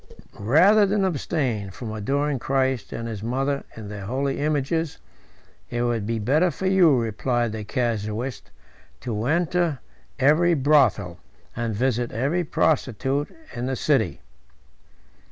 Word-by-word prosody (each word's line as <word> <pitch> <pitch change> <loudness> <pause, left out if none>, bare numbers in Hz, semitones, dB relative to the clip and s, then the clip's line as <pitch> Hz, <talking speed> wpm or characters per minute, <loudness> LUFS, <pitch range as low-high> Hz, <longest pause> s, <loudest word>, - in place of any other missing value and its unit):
"Rather 180 - +5
than 200 0 +1
abstain 135 - -1
from 110 +4 -7
adoring 135 +6 -1
Christ 130 -3 0
and 115 0 -4
his 110 -3 -5
Mother 135 +5 -1
in 110 -2 -7
their 100 -1 -7
holy 135 +3 -1
images, 150 +2 -1 0.7
it 120 0 -1
would 115 -4 -1
be 115 0 -1
better 145 - +2
for 180 +4 -5
you," 185 -7 +5
replied 120 +1 -1
the 110 0 -5
casuist, 115 +1 -3 0.5
"to 110 -2 -3
enter 170 0 +1 0.4
every 155 +5 +4
brothel, 130 - +2 0.4
and 115 -2 -2
visit 120 +1 0
every 140 +10 0
prostitute, 140 -3 0 0.3
in 120 +1 -3
the 130 - -1
city." - - +1
130 Hz, 130 wpm, -24 LUFS, 115-150 Hz, 0.7 s, Rather